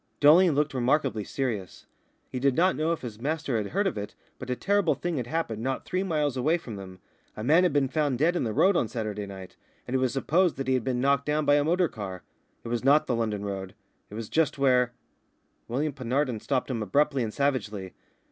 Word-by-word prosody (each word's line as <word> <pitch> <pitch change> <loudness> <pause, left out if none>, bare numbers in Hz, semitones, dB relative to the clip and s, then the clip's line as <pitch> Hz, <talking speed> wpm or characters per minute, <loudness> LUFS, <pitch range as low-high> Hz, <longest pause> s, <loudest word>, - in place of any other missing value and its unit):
Dolling 160 +4 +6
looked 145 +1 0
remarkably 130 -3 +1
serious. 110 -7 -4 0.4
He 130 - -5
did 135 0 +2
not 185 +3 +3
know 155 +2 0
if 170 - -2
his 115 -3 -8
master 145 -3 -1
had 105 -2 -2
heard 200 - 0
of 180 - -1
it, 100 0 -7 0.2
but - - -7
a 125 - 0
terrible 200 +7 +1
thing 175 -3 -3
had 120 -2 -3
happened 120 -8 -2
not 130 +2 -2
three 185 - -1
miles 150 -7 0
away 155 +7 +2
from 120 -10 -8
them. 95 -2 -9 0.4
A 110 - -4
man 155 +8 +5
had 180 -2 +3
been 140 -2 +2
found 145 -2 0
dead 165 +6 +2
in - - 0
the 115 - -1
road 190 - +3
on 120 - +2
Saturday 105 -3 -4
night, 95 -2 -10 0.3
and 125 - -6
it - - +3
was 130 -1 +1
supposed 165 +5 +1
that 135 - -4
he 130 - +2
had 130 -3 +1
been 125 0 -1
knocked 140 +1 +2
down 150 0 +1
by 145 - +4
a 145 0 +4
motor 175 +3 +2
car. 95 - -7 0.4
It - - -6
was 120 0 -2
not 145 +3 +5
the 125 - -1
London 110 -3 -2
road; 95 -2 -5 0.3
it 105 - -9
was 115 -1 -5
just 160 +2 +1
where 125 -3 +3 0.8
William 140 +5 -1
Penarden 130 -1 -1
stopped 135 -1 -1
him 115 -3 -2
abruptly 140 +7 +1
and 110 -2 -2
savagely. 105 -9 -2
130 Hz, 230 wpm, -27 LUFS, 115-150 Hz, 0.8 s, Dolling